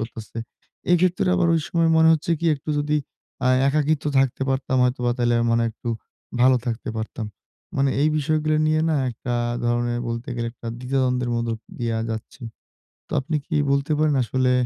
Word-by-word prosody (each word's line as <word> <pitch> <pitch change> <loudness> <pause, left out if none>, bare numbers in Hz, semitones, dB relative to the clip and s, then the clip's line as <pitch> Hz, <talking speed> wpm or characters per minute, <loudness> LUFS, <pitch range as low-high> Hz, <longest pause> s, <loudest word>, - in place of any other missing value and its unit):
করতেছে। 115 0 -7 0.5
এক্ষেত্রে 180 +2 +3
আবার 175 -2 +2
ওই 165 - +2
সময় 165 -1 +2
মনে 160 0 +6
হচ্ছে 160 +1 -1
কী 170 - 0
একটু 145 +2 -6
যদি 150 +1 +1 0.5
আ - - +5 0.2
একাকিত্ব 150 +1 +1
থাকতে 135 0 +1
পারতাম 130 0 0
হয়তোবা 125 -1 0
তাইলে 120 -1 +2 0.2
মনে 115 0 +3
হয় 115 - 0
একটু 115 - -8 0.5
ভালো 130 +1 +6
থাকতে 115 -1 -3
পারতাম। 110 0 -4 0.5
মানে 135 0 +2
এই 150 - +4
বিষয়গুলো 155 +1 +1
নিয়ে 155 0 +2
না 160 - +2
১ 120 - -5
টা 120 - 0 0.3
ধরনের 120 0 0
বলতে 115 +3 -4
গেলে 120 0 -2
১ 120 - -24
টা 115 - -4
দ্বিধা-দ্বন্দ্বের 125 -1 0
মধ্য 115 0 -1 0.3
দিয়া 115 -1 -1
যাচ্ছি। 110 +4 -7 0.7
তো - - -9
আপনি 155 +4 -2
কী 160 - -1 0.2
বলতে 140 +2 +1
পারেন 155 -1 +3
আসলে 130 +2 +1
130 Hz, 180 wpm, -23 LUFS, 120-155 Hz, 0.7 s, মনে